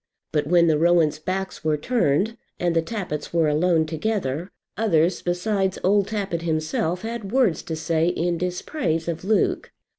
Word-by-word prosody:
But 150 -1 0
when 170 +1 +5
the 155 -2 +3
Rowans' 165 -3 +3
backs 190 +4 -4
were 155 -1 +1
turned, 220 - +1 0.2
and 175 -1 0
the 165 - +4
Tappitts 165 -5 -5
were 165 -2 +2
alone 160 +2 +2
together, 165 -1 -2 0.3
others 175 -5 +2
besides 190 +2 0
old 200 +1 +3
Tappitt 200 -6 -2
himself 160 +2 -1
had 225 -3 -5
words 235 - +2
to 160 - -5
say 160 +1 0
in 175 -1 0
dispraise 180 - -2
of 170 0 -3
Luke. 210 +2 +1
175 Hz, 155 wpm, -23 LUFS, 160-195 Hz, 0.3 s, when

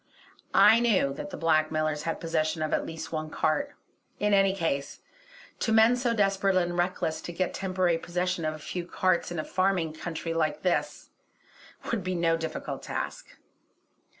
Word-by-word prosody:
I 225 - +7
knew 205 -13 +2
that 140 - -6
the - - -7
blackmailers 155 -1 +1
had 165 - -2
possession 155 -1 -1
of 155 - -2
at - - 0
least 160 0 -7
one 155 -1 -3
cart; 155 -1 -1 0.4
in 210 0 +2
any 195 -1 +5
case, 145 -6 -2 0.6
to 225 - 0
men 220 +2 +6
so 245 -2 0
desperate 195 -2 +2
and 175 -1 +1
reckless 175 -3 -1
to - - -6
get 180 +2 -2
temporary 185 -3 0
possession 180 0 -2
of 155 0 -1
a - - -8
few 175 +3 -5
carts 185 -1 +1
in 175 - -4
a 155 - -1
farming 185 -4 0
country 165 0 -4
like 155 -2 -1
this 180 -2 -1 0.8
would 225 -5 -1
be 185 0 -2
no 165 -1 +2
difficult 165 0 -5
task. - - -5
175 Hz, 170 wpm, -28 LUFS, 155-190 Hz, 0.8 s, I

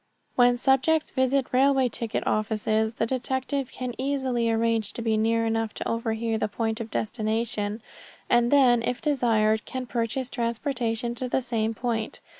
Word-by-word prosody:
When 245 0 +5
subjects 270 +5 +2
visit 260 0 +1
railway 265 0 +4
ticket 230 -1 -3
offices 220 +1 0
the 225 - 0
detective 260 +2 -2
can 250 -1 -5
easily 260 -4 0
arrange 225 -2 0
to - - -5
be 225 -1 +1
near 225 +1 +2
enough 225 -1 -1
to - - -4
overhear 225 -1 -1
the - - 0
point 225 +1 -2
of 225 - -6
destination, 215 -1 -2 0.4
and 240 0 +3
then 250 -4 +5
if 245 +1 -2
desired 225 -7 +2
can 260 -1 -5
purchase 240 +2 -2
transportation 235 -1 -2
to 250 +1 -4
the 260 - 0
same 225 -2 -1
point. 225 -2 -3
235 Hz, 155 wpm, -26 LUFS, 225-255 Hz, 0.4 s, When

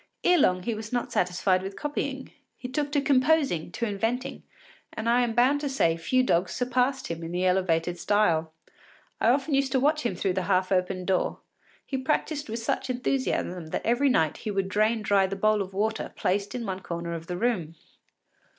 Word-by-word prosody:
Ere 355 -1 +5
long 185 -8 +3
he 230 - -1
was 215 0 -7
not 245 -1 -2
satisfied 185 +1 +1
with 195 +1 -6
copying; 280 -2 -4 0.3
he 250 - -6
took 290 +3 -2
to 290 - +2
composing, 275 - +2
to 235 - -2
inventing, 225 +4 -2 0.5
and 220 - -4
I 240 +1 +4
am 240 -2 0
bound 265 +5 +3
to 290 - -2
say 170 -12 +2
few 210 +11 +1
dogs 170 -7 +1
surpassed 255 +2 0
him 165 0 -5
in 165 - -5
the 180 +1 -1
elevated 175 -2 +1
style. 170 -7 +2 0.7
I 225 - +3
often 275 +4 +1
used 275 0 +2
to 265 - +3
watch 300 +3 +2
him 240 - -1
through 190 -2 0
the 185 - -1
half 185 0 +2
open 185 0 0
door; 190 -1 0 0.4
he 265 - -3
practised 290 0 -1
with 225 - -3
such 240 +3 -2
enthusiasm 250 -9 -1
that - - -4
every 245 +5 +3
night 160 - +2
he - - -5
would 195 -2 -1
drain 215 +2 +1
dry 200 -2 +3
the 195 - -4
bowl 215 +1 +2
of 190 -1 -5
water 215 +3 -2
placed 200 +3 -1
in 240 -2 -3
one 190 -2 -3
corner 170 -2 -5
of 165 0 -6
the 180 - -3
room. 180 -8 -1
215 Hz, 200 wpm, -27 LUFS, 185-255 Hz, 0.7 s, Ere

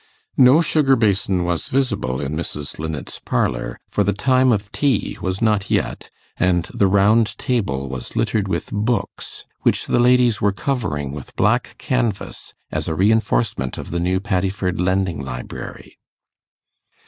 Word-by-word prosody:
No 130 +5 +7
sugar 150 -4 +3
basin 100 -5 +1
was 85 -1 -2
visible 105 - 0
in 70 +1 -3
Mrs. 75 -3 -5
Linnet's 80 -3 -5
parlour, - - -1
for 105 - +1
the 100 +1 +1
time 130 +4 +3
of 100 -2 -1
tea 135 -7 0
was 95 +1 -2
not 105 -3 +1
yet, - - -1 0.3
and 90 -2 +2
the 100 - +3
round 105 +3 +3
table 95 - -1
was 65 -2 -7
littered 105 -3 0
with 95 - -3
books 110 +4 -2 0.2
which - - +2
the - - +1
ladies 125 -2 +4
were 105 - +3
covering 95 - -2
with 70 -2 -9
black - - +1
canvass 120 -6 -2 0.2
as - - -2
a 80 - -1
reinforcement 80 - +1
of - - -7
the 85 - -1
new 90 +2 +1
Paddiford 95 -2 -1
Lending 95 -4 0
Library. 60 -2 -8
100 Hz, 150 wpm, -21 LUFS, 85-115 Hz, 0.3 s, No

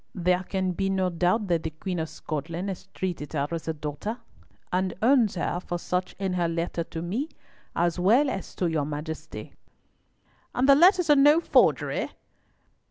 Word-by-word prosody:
"There 180 0 +2
can 185 0 -1
be 195 +2 -1
no 190 -1 +1
doubt 180 +6 +1
that 170 -2 +2
the 160 - -3
Queen 175 +3 -4
of 160 0 -3
Scotland 160 +4 -4
has 190 - -6
treated 175 -6 -4
her 145 -2 0
as 165 -1 -4
a 160 - 0
daughter, 150 +10 -4 0.6
and 185 0 0
owns 235 -4 +4
her 175 0 -1
for 175 -1 -4
such 180 +1 -2
in 190 -1 -2
her 175 -2 +1
letter 170 0 -2
to 165 0 -6
me, 230 - -2 0.5
as 175 +1 +1
well 230 +11 +4
as 195 -7 -4
to 180 - -1
your 160 -3 +1
Majesty." 155 +2 -6 1.0
"And 255 +2 +2
the 280 - +9
letters 350 +2 +5
are - - +8
no 290 +3 +6
forgery?" - - +2
180 Hz, 175 wpm, -26 LUFS, 165-205 Hz, 1.0 s, the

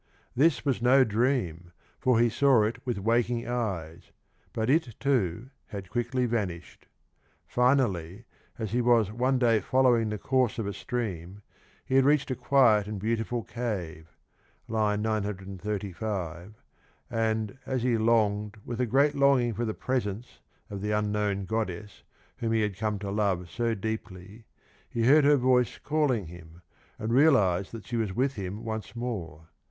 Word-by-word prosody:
This 150 +4 +3
was 135 -4 0
no 130 +2 +6
dream, 105 - -1 0.3
for 125 -3 +3
he 120 - +5
saw 130 -1 +4
it 110 +2 -3
with 120 - -1
waking 115 +3 0
eyes, 95 -10 -4 0.4
but 110 0 -2
it, 135 -5 +1
too, 125 -3 0 0.2
had 100 -3 -8
quickly 125 +1 0
vanished. 100 -8 -4 0.6
Finally, 115 - +1 0.3
as 110 -4 -4
he 120 +2 +1
was 115 -4 +3
one 130 +4 +1
day 115 -3 +3
following 120 0 +2
the 105 - -3
course 130 +1 +1
of 115 - -2
a 100 - -3
stream, 100 -4 -5 0.4
he - - -4
had 135 - +6
reached 145 0 +2
a - - 0
quiet 125 -5 +3
and 105 -1 -5
beautiful 115 +2 -2
cave 90 -9 -5 0.6
(935), 105 -3 -3 0.6
and, 110 0 -1
as 130 -2 -1
he 125 -2 +2
longed 110 -2 +1
with 120 0 -3
a 125 - +1
great 140 +5 +3
longing 135 -4 +3
for 120 +3 -2
the 110 - -3
presence 120 -3 -3 0.3
of 100 -1 -5
the 105 - -2
unknown 105 -2 0
goddess 105 -1 -4 0.4
whom 115 -1 -1
he 110 - +2
had 105 -2 -1
come 105 +1 -2
to 100 0 -5
love 95 -4 -1
so 115 -1 -1
deeply, 105 0 -6 0.4
he 115 - -2
heard 145 +3 +6
her 145 0 +6
voice 125 -1 +2
calling 145 - 0
him, 85 0 -13 0.3
and 110 +2 -2
realised 105 - +4
that 115 -3 -9
she 120 - -3
was 110 -4 -1
with 135 +2 +1
him 100 0 -6
once 110 +1 -5
more. 85 -10 -5
110 Hz, 155 wpm, -28 LUFS, 100-125 Hz, 0.6 s, no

